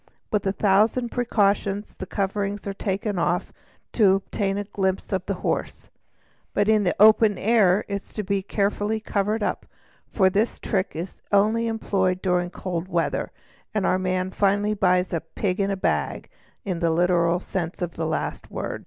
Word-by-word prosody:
With 205 -2 0
a - - +3
thousand 215 +5 +2
precautions 205 -4 0
the 190 - -5
coverings 200 +1 -2
are 200 - -3
taken 195 0 -2
off 175 +1 0 0.4
to 200 -4 +5
obtain 195 0 -2
a 205 - -1
glimpse 190 0 -2
of 190 -1 0
the 200 - -1
horse: - - -3 0.6
but 205 - +2
in 215 -1 +4
the 180 - +1
open 215 -1 +6
air 210 -3 +3
it 200 -1 -3
is - - -22
kept 200 -2 -2
carefully 205 +1 0
covered 210 0 -1
up, - - -2 0.4
for 190 -3 +3
this 210 +5 0
trick 195 -4 -2
is 170 +3 -6
only 215 +3 +3
employed 190 -5 0
during 180 -1 +1
cold 175 -1 -4
weather, 170 -3 -1 0.5
and 210 - +1
our 185 - +2
man 185 0 -1
finally 205 +2 +1
buys 180 -3 +2
"a 165 - 0
pig 185 +4 -3
in 200 0 +1
a 195 - -1
bag" - - -1 0.3
in 185 -4 -2
the 170 -1 +2
literal 170 +1 +2
sense 175 -2 -4
of 175 -1 -2
the 160 - -3
last - - -3
word. - - -4
195 Hz, 170 wpm, -24 LUFS, 185-210 Hz, 0.6 s, open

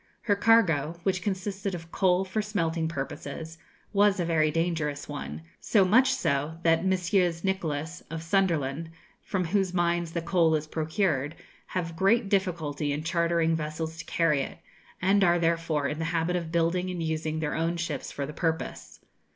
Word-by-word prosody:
Her 205 - +2
cargo, 170 -8 +3
which 185 -1 0
consisted 195 0 -2
of 165 -1 -9
coal 185 -1 +2
for 190 +3 -1
smelting 165 -6 -1
purposes, 160 +2 -6 0.3
was 200 -1 +4
a 175 - +1
very 160 -2 +2
dangerous 160 -2 -1
one; 80 - -6 0.2
so 200 -4 +3
much 255 +8 +5
so 155 - 0
that 165 0 +3
Messrs. 180 -2 +1
Nicholas, 165 -4 -2
of 165 0 -5
Sunderland, 165 -4 0 0.3
from 185 -3 -2
whose 190 +1 0
mines 170 -1 +1
the 170 - -1
coal 170 -2 +3
is 155 0 -1
procured, 155 -2 -1 0.3
have 170 -3 -3
great 195 +4 +3
difficulty 160 -7 0
in 145 +2 -2
chartering 170 -1 +1
vessels 160 +1 -4
to 165 - -7
carry 155 -4 +2
it, - - -5 0.5
and 195 +2 +4
are 175 -1 +4
therefore 165 -3 +1
in 150 +3 -4
the 165 - -1
habit 165 +1 0
of 170 -2 -3
building 170 +2 +1
and 175 -2 -3
using 160 0 -2
their 155 -2 -1
own 165 +1 0
ships 170 -3 -3
for 140 - -3
the 150 - -7
purpose. 160 0 -3
165 Hz, 165 wpm, -28 LUFS, 160-185 Hz, 0.5 s, much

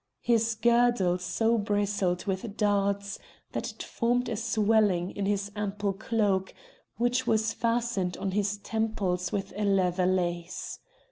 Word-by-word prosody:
His 230 -1 +2
girdle 235 -5 +3
so 225 +5 +1
bristled 205 -3 0
with 200 +2 -3
darts 200 -1 0 0.3
that - - -3
it - - -8
formed 245 +1 0
a 225 - -1
swelling 215 -5 +2
in 200 -1 -3
his 200 0 -1
ample 205 -1 -1
cloak, 200 -2 0 0.4
which 245 +2 +1
was 220 -1 +2
fastened 230 -6 0
on 195 - -2
his 205 +1 0
temples 200 -5 -1
with 195 -2 -3
a 210 - -2
leather 185 -2 +2
lace. 175 -2 -2
205 Hz, 135 wpm, -28 LUFS, 190-225 Hz, 0.4 s, girdle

